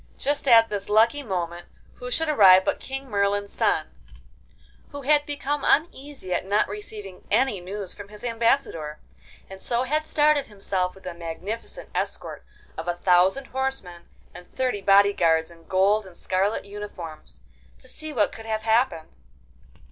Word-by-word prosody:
Just 285 0 -1
at 225 -2 +7
this 205 -1 -4
lucky 225 +7 +4
moment 175 -7 -4 0.3
who 250 - -6
should 320 +6 0
arrive 190 -10 +7
but - - 0
King 270 +1 -6
Merlin's 200 -2 0
son, - - +1 1.0
who 285 -1 -8
had 295 +2 +3
become 290 0 -2
uneasy 285 - 0
at 175 - 0
not 200 +3 +1
receiving 205 -2 -8
any 230 -1 +2
news 195 +1 -6
from 205 -1 -10
his 210 +2 -11
Ambassador, 230 - 0 0.5
and 190 0 -11
so 240 0 0
had 305 +4 -1
started 295 -2 +3
himself 195 -3 -2
with 190 - -17
a 180 - -4
magnificent 170 +6 -7
escort - - -4 0.4
of 165 - -6
a 175 - 0
thousand 185 +9 +3
horsemen, 265 -10 -4 0.2
and 180 0 -13
thirty 255 -6 -1
body 200 +1 +5
guards 160 -2 +2
in 165 -1 -18
gold 195 +2 +2
and 180 - -15
scarlet 195 +3 -1
uniforms, 200 -6 -9 0.3
to 255 - -18
see 310 +4 -5
what 225 -8 +1
could 225 0 -10
have 220 0 -2
happened. 220 -7 +1
205 Hz, 155 wpm, -25 LUFS, 185-260 Hz, 1.0 s, at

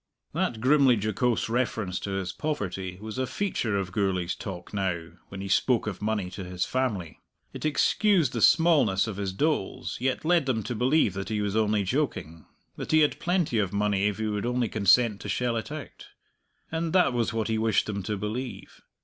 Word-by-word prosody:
That 110 -2 -1
grimly 135 -1 +5
jocose 115 +3 0
reference 115 -5 -1
to - - -5
his 95 -2 -3
poverty 95 - -3
was 110 +4 -6
a 130 - 0
feature 120 - -1
of 95 -2 -3
Gourlay's 90 -3 0
talk 95 -2 -8
now, 90 -4 -2 0.2
when 95 0 -8
he 100 - -5
spoke 115 +5 +2
of 105 -4 -5
money 105 -4 -1
to 95 - -6
his 90 0 -2
family. 110 -11 -2 0.3
It - - -6
excused 170 - +2
the 115 - -2
smallness 150 - +4
of 110 -4 -5
his 100 -2 -2
doles, 145 +1 -1
yet 130 +3 -1
led 170 -4 +3
them 115 -5 0
to 115 - -3
believe 125 - +2
that 95 +2 -5
he 110 -1 -1
was 105 0 -1
only 105 -2 +2
joking 95 - -2 0.3
that - - -5
he 155 0 +5
had 150 - +2
plenty 175 -10 +1
of 100 -3 -1
money 100 -1 +1
if 105 - -2
he 110 - -2
would 105 +1 -2
only 125 -2 0
consent 105 +1 +3
to - - -6
shell 125 -1 0
it 115 +4 -4
out. 155 -2 -8 0.6
And 165 0 -2
that 185 -8 +4
was 120 -2 0
what 115 -1 -1
he 110 -1 0
wished 110 -2 +2
them 100 -2 -3
to 105 +2 -3
believe. 115 +5 -5
110 Hz, 200 wpm, -27 LUFS, 100-130 Hz, 0.6 s, grimly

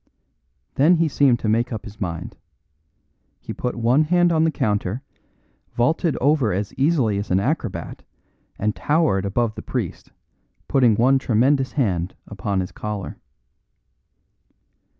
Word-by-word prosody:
Then 155 +6 +4
he 165 -1 +2
seemed 140 -4 +3
to - - -2
make 115 +3 +1
up 110 -3 -5
his 105 +1 -12
mind. 85 -4 -4 1.0
He - - -7
put 125 - -3
one 120 +6 +2
hand 175 +2 +3
on 160 -1 +3
the - - +3
counter, 105 -2 -1 0.7
vaulted 150 +5 +1
over 140 -5 +2
as 100 +3 -3
easily 135 -8 +1
as 100 - -5
an 90 - +2
acrobat 110 - -3 0.6
and 105 +1 -1
towered 145 - +1
above 110 +3 0
the - - -8
priest, - - -5 0.6
putting 125 -5 +4
one 130 +5 +3
tremendous 130 +3 +1
hand 95 - -1
upon 100 -1 -2
his 90 - -5
collar. 105 -3 -6
120 Hz, 135 wpm, -22 LUFS, 105-145 Hz, 1.0 s, Then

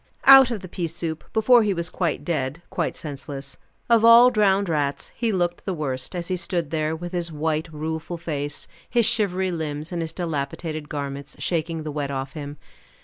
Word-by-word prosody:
Out 270 -2 +9
of 225 -5 -3
the 185 - -8
pea 175 -1 -3
soup 165 -1 -4
before 235 +2 +5
he 205 -3 +1
was 170 0 -3
quite 165 -5 -1
dead, 150 -1 -2
quite - - -2
senseless. 140 -2 -7 0.3
Of 230 -2 +4
all 235 +2 +9
drowned 200 -3 +3
rats, 145 -4 -1
he 230 -2 0
looked 175 -3 -1
the 190 -2 -2
worst, 135 0 -4
as 170 -1 -3
he 185 - 0
stood 170 -3 -2
there 155 0 0
with 175 +2 -6
his 175 -2 -2
white, 160 +1 -2
rueful 160 +2 -4
face, 145 -3 -4 0.2
his 235 -2 +3
shivery 190 -5 +1
limbs, 155 -1 -4
and 175 -1 -2
his 160 -1 -3
dilapidated 155 -2 -4
garments, 140 -1 -5
shaking 165 -1 -2
the 155 - -4
wet 145 -1 -3
off 135 -1 -4
him. 145 -1 -7
165 Hz, 190 wpm, -24 LUFS, 150-185 Hz, 0.3 s, Out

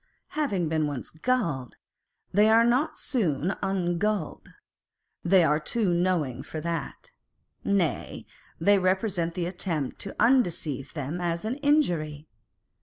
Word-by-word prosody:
Having 205 - -1
been 155 -1 0
once 140 -4 -5
gulled, 160 - -1 0.6
they 210 +3 +5
are 225 +1 +6
not 275 +6 +1
soon 180 - 0
ungulled. 190 -1 -1 0.7
They 180 0 +5
are 150 -1 +3
too 185 +4 0
knowing 170 -8 0
for 155 - -6
that. 170 - -5 0.5
Nay, 190 -8 -1 0.3
they 200 +4 +4
resent 185 -2 0
the 175 - -1
attempt 170 -6 -3
to 200 - -5
undeceive 165 - +1
them 150 +4 -4
as 170 +2 -2
an 240 +5 -2
injury. 175 - +1
175 Hz, 120 wpm, -27 LUFS, 155-210 Hz, 0.7 s, are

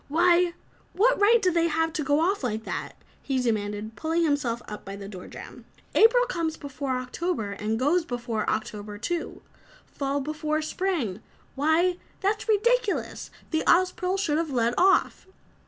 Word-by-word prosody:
"Why, 345 +3 +3 0.4
what 480 +6 +3
right 435 0 +5
have 365 - +3
they 335 0 +2
to 325 0 0
go 290 +2 +2
off 380 0 +1
like 220 -3 -2
that?" - - -4 0.3
he 270 -2 -1
demanded, 215 -2 -2
pulling 325 +2 0
himself 285 -7 0
up 210 - -7
by 195 - -7
the 200 0 -8
door 185 -3 -9
jam. - - -11 0.3
"April - - +6
comes 335 -9 -2
before 275 -2 -3
October 255 - -3
and 210 +2 -2
goes 300 +8 +2
before 240 -5 -3
October, 210 -1 -3
too. 335 +10 -4 0.4
Fall 280 0 -2
before 305 +2 -2
spring 310 - -2 0.3
why, 320 +5 +2 0.2
that's 420 +3 -1
ridiculous! 475 +1 +1 0.2
The 315 -1 +1
Ozpril 365 +1 +3
should 320 -6 +1
have 330 -1 -2
led 240 -3 +1
off!" 380 0 +3
310 Hz, 155 wpm, -26 LUFS, 235-360 Hz, 0.4 s, April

